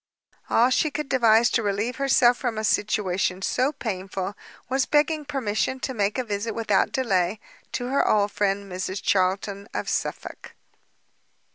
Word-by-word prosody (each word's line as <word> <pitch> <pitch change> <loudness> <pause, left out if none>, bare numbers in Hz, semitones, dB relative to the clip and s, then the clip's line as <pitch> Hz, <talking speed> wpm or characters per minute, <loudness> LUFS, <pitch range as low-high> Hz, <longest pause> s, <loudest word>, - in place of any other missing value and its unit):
All 245 +3 +4
she 310 - +2
could 295 0 -5
devise 230 -3 +4
to 230 - +2
relieve 210 +4 -1
herself 260 -3 +4
from 240 -3 -3
a 215 - -2
situation 195 -3 0
so 255 +6 +1
painful, 195 -6 -4 0.3
was 265 +2 0
begging 300 0 +2
permission 260 -2 -1
to 265 - -3
make 205 -1 0
a 255 - 0
visit 215 0 -3
without 220 -4 +1
delay 205 - 0 0.3
to 245 - -2
her 275 - +2
old 205 -1 +2
friend 200 0 0
Mrs 190 +1 -4
Charlton 195 +1 0
in - - -2
Suffolk. - - -4
220 Hz, 150 wpm, -24 LUFS, 200-260 Hz, 0.3 s, All